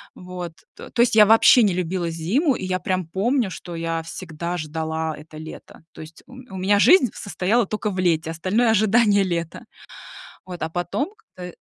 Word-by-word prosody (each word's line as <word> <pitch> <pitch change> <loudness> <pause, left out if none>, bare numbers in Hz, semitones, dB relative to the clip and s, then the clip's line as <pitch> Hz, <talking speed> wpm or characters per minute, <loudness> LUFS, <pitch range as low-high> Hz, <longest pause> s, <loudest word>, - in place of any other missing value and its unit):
вот. 180 -2 -8 0.2
То - - -11
то 235 - 0
есть 240 -2 +3
я 210 -1 +8
вообще 225 +2 +6
не 195 -4 +2
любила 175 -1 -2
зиму, 220 - 0
и 185 - -5
я 185 0 -1
прям 185 -1 -2
помню, 220 +5 0
что 175 -2 -8
я 165 0 -3
всегда 170 +1 -6
ждала 160 0 -4
это 155 +1 -13
лето. 160 0 -11
То - - -11
есть 155 +1 -13
у 255 - -15
м 255 0 -12
у 190 - -8
меня 200 +2 +2
жизнь 275 - +5
состояла 200 +4 -1
тока 210 0 -3
в 185 - -5
лете, 165 -3 0
остальное 205 +8 +1
ожидание 215 -1 +3
лета. 170 -3 -4 0.8
Вот, 180 -3 -9
а, 160 - -2
потом 175 - -3 0.2
как-то 180 -1 -9
185 Hz, 190 wpm, -22 LUFS, 165-215 Hz, 0.8 s, я